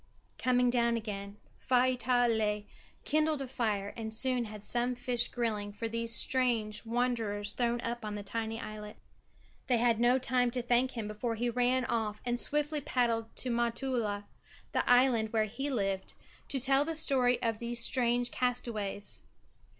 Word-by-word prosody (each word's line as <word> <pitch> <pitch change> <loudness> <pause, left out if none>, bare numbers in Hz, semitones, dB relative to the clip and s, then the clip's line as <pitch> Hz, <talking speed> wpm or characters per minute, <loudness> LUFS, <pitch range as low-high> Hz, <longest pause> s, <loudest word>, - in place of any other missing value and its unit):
Coming 250 -1 +2
down 235 -1 +2
again, 200 -2 -6 0.2
Faivaatala 245 -4 +1 0.4
kindled 310 0 +1
a 270 - -4
fire 210 -5 -2
and 220 -1 -5
soon 250 +2 0
had 210 -1 -9
some 245 +3 0
fish 245 0 0
grilling 215 -4 -3
for 210 +3 -5
these 230 0 0
strange 230 -6 +4
wanderers 225 -4 -1
thrown 240 -1 0
up 235 0 -4
on 210 -1 -4
the 205 - -6
tiny 225 +2 -4
islet. 210 -1 -8 0.7
They 245 - +3
had 230 -1 +2
no 240 +2 +4
time 250 -1 +1
to 250 0 -2
thank 245 +2 +1
him 220 -2 -3
before 220 +2 -3
he 240 +2 -1
ran 250 +1 +1
off 220 -3 -2
and 240 0 0
swiftly 295 +1 0
paddled 230 -4 -1
to 255 - -3
Motutala, 235 -3 -1 0.5
the - - -1
island 245 -3 +4
where 220 -1 +2
he 255 +7 -4
lived, 195 -7 -2 0.3
to 270 - 0
tell 270 +2 +4
the 325 +2 -4
story 255 -5 +2
of 225 -2 -1
these 235 0 -2
strange 245 -1 +1
castaways. 230 -5 +1
235 Hz, 160 wpm, -31 LUFS, 220-250 Hz, 0.7 s, strange